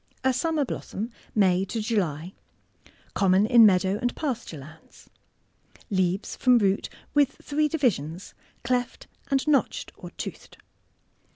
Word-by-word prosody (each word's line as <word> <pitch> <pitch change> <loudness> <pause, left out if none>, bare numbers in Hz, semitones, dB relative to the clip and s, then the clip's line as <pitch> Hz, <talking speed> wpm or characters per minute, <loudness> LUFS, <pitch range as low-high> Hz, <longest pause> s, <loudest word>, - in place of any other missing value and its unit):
A 260 0 +3
summer 305 +3 0
blossom— 230 -2 -5 0.2
May 190 -3 +3
to 225 - -4
July. 185 -6 -2 0.8
Conmioii 195 +1 +3
in 235 -2 +9
meadow 190 +1 +2
and 245 -1 -1
pasture 245 - -4
lands. 155 +4 -15 0.8
Leaves 185 0 0
from 250 -1 +4
root— 200 -3 +1 0.2
with 285 -2 +3
three 300 +1 +1
divisions 190 - -1 0.3
cleft 245 0 -2 0.2
and 275 +1 0
notched 290 -3 +1
or - - -10
toothed. - - -8
215 Hz, 120 wpm, -26 LUFS, 185-260 Hz, 0.8 s, in